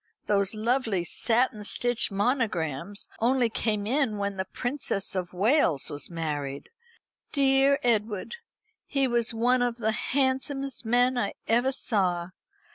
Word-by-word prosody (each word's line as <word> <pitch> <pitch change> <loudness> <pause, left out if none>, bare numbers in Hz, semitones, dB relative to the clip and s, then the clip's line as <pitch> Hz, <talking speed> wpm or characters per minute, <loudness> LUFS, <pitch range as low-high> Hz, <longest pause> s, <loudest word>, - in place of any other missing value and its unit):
Those 200 0 +1
lovely 225 -4 0
satin 225 +3 0
stitch 245 +3 +1
monograms 200 - -1
only 240 0 +2
came 210 -2 -1
in 250 -2 0
when 200 0 -2
the 190 0 -3
Princess 245 -3 -2
of 180 -2 -3
Wales 195 - +2
was 145 - -2
married. 145 -5 -4 0.6
Dear 275 0 +4
Edward! 220 - 0 0.5
He 275 -2 +1
was 240 -1 +1
one 245 +2 +2
of 245 -1 0
the 220 -2 0
handsomest 270 +1 -1
men 245 +2 +3
I 200 -4 -2
ever 240 +4 +2
saw. 185 -9 0
225 Hz, 125 wpm, -27 LUFS, 195-255 Hz, 0.6 s, Dear